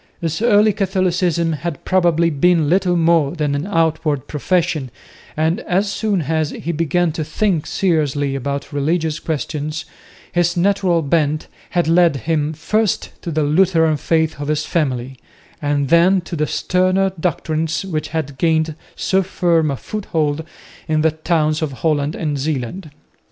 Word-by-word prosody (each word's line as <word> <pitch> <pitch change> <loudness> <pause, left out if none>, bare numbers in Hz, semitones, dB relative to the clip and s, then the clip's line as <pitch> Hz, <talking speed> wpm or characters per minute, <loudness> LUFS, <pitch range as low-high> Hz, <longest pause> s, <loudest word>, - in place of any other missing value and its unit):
His 165 +1 -2
early 215 -2 +4
Catholicism 180 -4 0
had 155 0 -5
probably 170 -3 +2
been 160 +1 +3
little 180 +1 +2
more 165 -3 +3
than 150 -3 -1
an 145 +5 -2
outward 160 -6 0
profession, 155 -3 0 0.5
and 160 +2 +1
as 195 +3 0
soon 205 -6 0
as 155 0 0
he 170 - -4
began 165 +1 +1
to 155 0 -3
think 170 +1 -1
seriously 150 -6 0
about 140 +2 -4
religious 155 +2 0
questions, 155 0 -3 0.5
his 175 0 +1
natural 185 -2 +2
bent 150 0 +1 0.2
had 175 -2 0
led 170 -1 +4
him 155 +1 -1
first 210 +7 -1
to - - -5
the 155 -1 0
Lutheran 160 0 +3
faith 160 -1 0
of 145 - -4
his 155 0 0
family, 130 -5 -2 0.4
and 145 -2 0
then 175 +3 +5
to 175 0 -7
the 150 -1 0
sterner 185 +1 +1
doctrines, 165 0 -1
which 155 -5 -3
had 145 -4 -4
gained 160 -1 +2 0.2
so 190 0 +1
firm 170 -4 +1
a 140 - -2
foothold 160 -7 -2 0.4
in 155 -1 +1
the 160 0 +3
towns 155 -1 0
of 150 -3 -2
Holland 150 +1 0
and 150 -3 -2
Zeeland. 150 +4 -3
160 Hz, 150 wpm, -19 LUFS, 150-175 Hz, 0.5 s, then